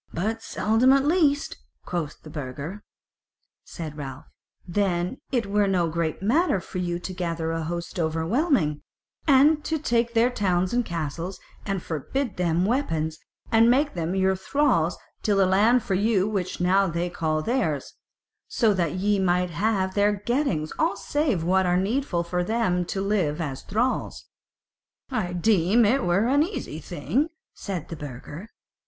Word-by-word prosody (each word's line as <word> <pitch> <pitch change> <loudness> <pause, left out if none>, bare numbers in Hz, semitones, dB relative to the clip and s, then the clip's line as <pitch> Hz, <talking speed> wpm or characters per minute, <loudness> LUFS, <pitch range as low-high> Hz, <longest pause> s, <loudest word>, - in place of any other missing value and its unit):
"But 220 +6 -2
seldom 225 +5 +3
at 275 0 +3
least," 295 -3 +2 0.3
quoth 165 -4 -4
the 155 - -10
Burgher. 145 +7 -6 0.8
Said 155 -3 -7
Ralph: 135 -2 -7 0.4
"Then 180 +2 0
it 245 -5 +1
were 205 0 +2
no 180 -3 +2
great 165 +1 -2
matter 265 - +2
for 185 - -6
you 175 -1 -1
to 175 +1 -6
gather 165 -2 -2
a 165 0 -2
host 170 +2 -4
overwhelming, 165 - +1 0.5
and 295 +2 +5
to 320 - -1
take 235 -5 0
their 235 +2 +4
towns 185 -4 0
and 245 0 +2
castles, 170 +1 -4 0.3
and 195 -3 -2
forbid 200 - -3
them 175 0 +1
weapons, 160 - -1 0.3
and 225 +1 +5
make 280 +4 +3
them 170 +1 -2
your 190 0 +2
thralls 190 - +1
to - - -22 0.2
till 205 -2 +1
the 195 - +5
land 215 +6 +4
for 195 - -2
you 200 0 +2
which 190 -4 -2
now 190 +2 +3
they 170 +1 -1
call 155 -3 -1
theirs; 160 - -1 0.5
so 225 -4 +2
that 170 -5 0
ye 200 +2 +1
might 180 -1 +1
have 195 +2 0
of - - -15
their 205 0 +3
gettings 205 - -1
all 325 +2 +1
save 285 - 0
what 185 +2 +2
were 180 0 +3
needful 195 -2 0
for 180 +1 -1
them 180 -4 0
to 195 - -3
live 190 -7 0
as 140 -5 -4
thralls." 240 +6 -1 0.9
"I 180 -9 -1
deem 200 +4 +3
it 255 +6 +2
were 175 +5 +2
an 280 +4 +3
easy 315 - -3
thing," 185 - -1 0.2
said 185 -6 -5
the 165 - -5
burgher. 150 - -8
190 Hz, 160 wpm, -25 LUFS, 170-230 Hz, 0.9 s, and